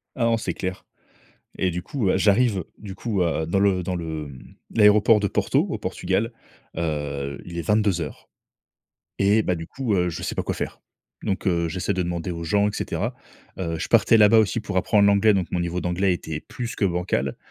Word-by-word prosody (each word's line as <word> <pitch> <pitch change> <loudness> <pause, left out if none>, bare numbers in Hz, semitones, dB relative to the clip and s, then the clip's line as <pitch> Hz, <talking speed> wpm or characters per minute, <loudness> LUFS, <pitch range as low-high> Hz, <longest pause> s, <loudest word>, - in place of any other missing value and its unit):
Ah 125 - -1
non, 115 0 +3
c'est - - -3
clair, 95 0 -5 0.7
et 95 - +1
du 90 +1 -4
coup, 125 -6 -2
heu, - - +2
j'arrive, 105 -3 +3
du 100 -3 -8
coup, 100 -1 -1
heu, 80 -2 0
dans 90 +4 0
le 95 -2 +2
dans 90 +1 -2
le, 80 -3 -4
mmh, 65 -2 -13 0.2
l'aéroport 105 +1 +6
de 100 - 0
Porto, - - +1
au - - -3
Portugal. - - -1 0.4
Heu, 70 -4 -3
il 85 -1 -7
est 85 - -1
22:00 100 -6 0 0.9
et 100 +3 +4
bah, 90 - 0
du 80 0 -7
coup, 125 -6 -2
heu, 90 -2 +2
je 85 - -5
sais - - -3
pas - - 0
quoi - - -2
faire. - - -5 0.4
Donc, 95 +1 -2
heu, 85 -1 +1
j'essaie 90 +3 -2
de 90 -1 -1
demander 85 +1 -3
aux 85 -1 -5
gens 100 +5 +2
et - - -4
cetera. - - -3 0.4
Heu, 85 -3 -2
je 90 - -4
partais 115 0 +5
là-bas 110 +1 +6
aussi 110 +1 +2
pour 100 -3 -5
apprendre 100 +2 +3
l'anglais, 100 +1 +4
donc 95 -3 0
mon - - -1
niveau 85 +1 -2
d'anglais 90 +2 +1
était 80 -3 -5
plus 120 -2 -6
que 100 - 0
bancal. 85 -7 -1
95 Hz, 210 wpm, -24 LUFS, 85-105 Hz, 0.9 s, l'aéroport